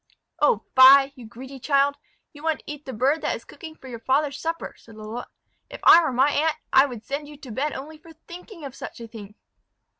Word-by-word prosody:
"Oh, - - +2
fie! 270 +1 +8
you 245 -4 -12
greedy 260 +4 -11
child; 280 +1 +2 0.4
you 290 - -14
want 320 0 0
to - - -39
eat 295 -1 -9
the - - -4
bird 265 +7 0
that - - -1
is - - -11
cooking 320 -4 -11
for 265 - -14
your 240 -3 -8
father's 280 +3 0
supper," 330 +1 -4
said 225 - -17
Lalotte. 220 +3 -8 0.4
"If - - -9
I 340 - +8
were 315 - -1
my 265 +4 +2
aunt, 310 +1 +1 0.2
I 265 +2 +6
would 235 -5 -9
send 285 +3 -5
you 295 0 -12
to 270 -4 -11
bed 280 +7 -2
only 300 +4 -9
for 330 +1 -16
thinking 345 +1 -12
of 270 - -8
such - - -9
a 230 - -8
thing." 210 -2 -12
275 Hz, 230 wpm, -24 LUFS, 250-305 Hz, 0.4 s, fie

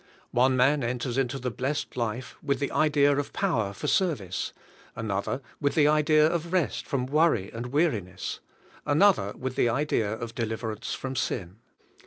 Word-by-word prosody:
One 130 +1 +3
man 135 +2 +3
enters 120 0 -2
into 135 0 0
the 125 -2 -3
blessed 135 +6 -3
life 120 +1 -3
with 140 -2 0
the 140 - -2
idea 145 -2 +3
of 145 0 -3
power 120 - 0
for 100 - -8
service; 115 - 0 0.4
another 110 +3 -2 0.2
with 145 -1 0
the 150 -2 +5
idea 155 0 +4
of 170 +1 -1
rest 185 -4 0
from 130 -2 -1
worry 140 - +2
and 120 +2 -5
weariness; 125 - -1 0.4
another 150 - +3
with 130 0 -4
the 125 -3 +3
idea 120 -4 0
of 115 +1 -5
de 115 - -2
liverance 110 -1 -4
from 135 0 -5
sin. 95 -7 -2
130 Hz, 165 wpm, -27 LUFS, 115-150 Hz, 0.4 s, the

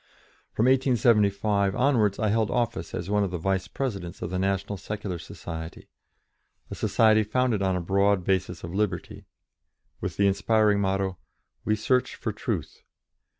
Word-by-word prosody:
From 115 - +1
1875 105 -6 +3
onwards 115 -7 +2
I 110 - 0
held 110 0 +1
office 120 -2 -2
as 85 - -4
one 105 0 +3
of 100 - -1
the 90 - -3
vice 95 +2 -1
presidents 100 -9 -4
of 90 - -4
the 95 - -1
National 95 +1 -1
Secular 100 -2 -5
Society 80 0 -8 0.8
a - - -3
society 110 -1 +3
founded 110 0 0
on 95 -1 +1
a 90 - -1
broad 100 +1 +2
basis 90 -2 -1
of 85 +1 -6
liberty, 95 -4 -2 0.7
with - - -4
the 100 - +3
inspiring 105 +1 +3
motto, 95 -1 -1 0.5
"We 110 - +2
Search 125 +4 0
for - - -4
Truth." - - -4
100 Hz, 150 wpm, -26 LUFS, 95-110 Hz, 0.8 s, 1875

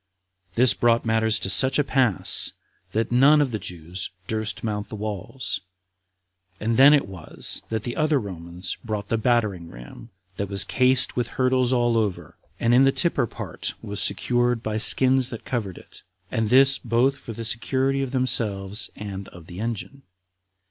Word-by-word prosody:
This 125 +1 +5
brought 115 0 +2
matters 110 -1 +1
to 95 - -2
such 130 +4 +4
a 145 - +3
pass 130 - +2 0.4
that 110 +2 -1
none 140 +5 +5
of 145 -4 +1
the 110 - -3
Jews 90 +1 -7 0.2
durst 110 +1 -3
mount 105 -2 -3
the - - -7
walls, 105 +4 -4 1.0
and 115 +2 -1
then 135 +4 +8
it 145 -6 +3
was 95 -5 -4
that 110 -1 -3
the 120 - -4
other 155 -2 +2
Romans 90 -3 -6
brought 105 -3 -4
the 115 - +1
battering 105 -8 0
ram 65 - -12 0.3
that 100 -1 -3
was 100 -1 +1
cased 130 0 +2
with 120 -2 -1
hurdles 130 -1 +1
all 120 -2 +2
over, 105 -4 -3 0.2
and 120 +1 +2
in 125 +2 +6
the 135 - +4
tipper 170 -6 0
part - - -6
was 105 0 -2
secured 120 -1 +1
by 110 0 -2
skins 130 +2 +4
that 115 - -9
covered 110 -8 -4
it, - - -13 0.3
and 110 -1 -1
this 135 +1 +5
both 120 +4 +1
for 115 - -8
the 115 +1 -7
security 130 +4 0
of 135 - -2
themselves 110 -6 0
and 100 -2 -7
of 85 -2 -14
the 85 +2 -10
engine. 115 +5 -5
115 Hz, 170 wpm, -24 LUFS, 105-130 Hz, 1.0 s, then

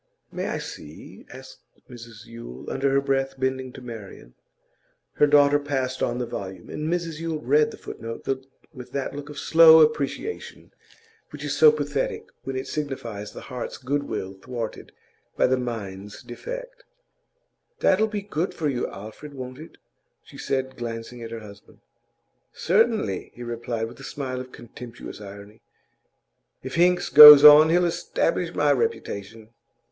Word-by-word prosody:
'May - - -4
I - - -2
see?' 75 +1 -10
asked - - -12 0.3
Mrs 120 -3 -12
Yule, 115 - -9
under 135 +1 0
her 135 +1 +2
breath, 135 -1 -1
bending 130 0 -2
to 135 - -11
Marian. 105 - -10 0.8
Her 150 - +3
daughter 145 0 +5
passed 135 -3 -3
on 120 - -1
the 125 - -2
volume, 95 -5 -8
and 155 +2 -3
Mrs 170 -3 -3
Yule 165 -2 -3
read 150 +4 +2
the - - -11
footnote 115 0 -8 0.5
with 125 -1 -11
that 140 0 -3
look 145 0 -8
of 150 - -10
slow 160 0 +7
apprehension 150 - -6 0.6
which - - -10
is - - -2
so 460 - +7
pathetic 460 0 -3 0.2
when 135 - -5
it 130 +1 -3
signifies 120 -9 -5
the - - -10
heart's 125 -1 -7
good 140 +3 -2
will 95 -8 -5
thwarted 115 +3 -7 0.5
by - - +3
the 130 - +2
mind's 105 -5 -6
defect. - - -8 1.0
'That'll 210 +3 +3
be 205 -2 -5
good 185 -3 -3
for 155 -3 -1
you, 125 -3 -2
Alfred, 110 +9 -10
won't 130 0 -8
it?' 160 - -13 0.5
she - - -17
said, 130 0 -3
glancing 120 0 -7
at 115 - -7
her 115 0 -7
husband. 100 -1 -15 0.8
'Certainly,' 205 - 0
he 120 - -9
replied, 115 -1 -4
with 115 +1 -13
a - - -11
smile 130 -3 -5
of 130 0 -11
contemptuous 120 -2 -11
irony. 100 +1 -12 1.0
'If 130 - -7
Hinks 180 +1 +2
goes 150 -1 +12
on, 150 +1 +9
he'll 175 +2 +3
establish 170 - -1
my - - +2
reputation. 110 - -3
130 Hz, 155 wpm, -24 LUFS, 115-150 Hz, 1.0 s, goes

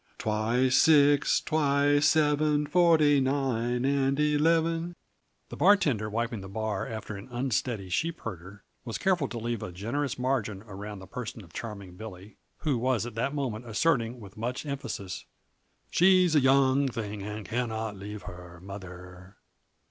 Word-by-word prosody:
Twice 115 +4 +1
six, 145 -2 +5
twice 145 -1 +2
seven, 150 0 +2
Forty 155 -3 +4
nine 130 -3 0
and 135 0 +1
eleven 165 +3 +2 0.3
" - - -45
The - - -7
bartender, 140 - +3
wiping 115 0 -2
the 95 - -9
bar 110 -1 -3
after 110 -1 -6
an 100 - -9
unsteady 120 -4 -2
sheepherder, 100 - -4 0.2
was 115 -2 -4
careful 180 -7 +1
to 120 - -6
leave 115 -1 -3
a 90 - -5
generous 120 +9 -3
margin 125 -6 -1
around 105 0 -8
the 95 - -10
person 115 0 -7
of 85 -2 -17
Charming 100 -6 -7
Billy 105 -1 -10 0.2
who 145 -7 0
was 125 -2 +1
at 120 - -7
that 130 +6 -2
moment 120 -5 -3
asserting 120 -1 +1
with 100 -1 -12
much 120 +6 -3
emphasis: 135 -9 -5 0.7
"She's 185 -1 +5
a 150 - +6
young 135 +1 +4
thing, 105 -4 -5
and 105 +1 -6
cannot 110 -3 -2
leave 100 0 -8
her 90 -1 -10
mother." 90 0 -10
120 Hz, 150 wpm, -28 LUFS, 105-145 Hz, 0.7 s, a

